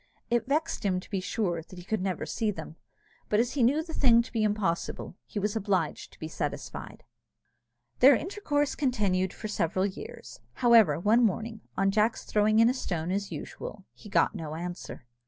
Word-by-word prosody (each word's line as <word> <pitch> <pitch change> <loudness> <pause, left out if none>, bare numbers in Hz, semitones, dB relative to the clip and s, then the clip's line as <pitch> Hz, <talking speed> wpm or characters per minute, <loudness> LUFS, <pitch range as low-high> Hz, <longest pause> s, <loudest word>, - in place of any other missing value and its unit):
It 240 +1 +1
vexed 305 +4 0
him, 185 -3 +1
to - - -13
be 195 - 0
sure, 185 -3 -1
that 175 +3 -14
he 175 - -10
could 220 0 -1
never 185 -3 -2
see 220 - -1
them; 160 -5 -6 0.5
but 210 - +3
as 240 +1 +2
he 280 - -1
knew 280 +7 +3
the 320 -1 -9
thing 235 -5 +5
to - - -12
be 230 - 0
impossible, 205 -5 -1
he - - -8
was 205 +1 0
obliged 190 -7 -1
to - - -19
be 155 - -4
satisfied. 150 -2 -5 1.0
Their 270 +1 +8
intercourse 295 - -1
continued 200 -9 +1
for 215 - -6
several 185 -2 0
years. 200 -1 -7
However, 225 - +5
one 220 +7 +4
morning, 225 +1 -1 0.2
on 195 0 +3
Jack's 215 +3 +1
throwing 215 +1 +2
in 230 +1 +7
a 245 - +3
stone 175 -9 -3
as 200 +1 -2
usual, 195 -2 -7
he 210 - -13
got 205 - +3
no 160 -6 -5
answer. 175 -6 -6
210 Hz, 190 wpm, -28 LUFS, 185-235 Hz, 1.0 s, Their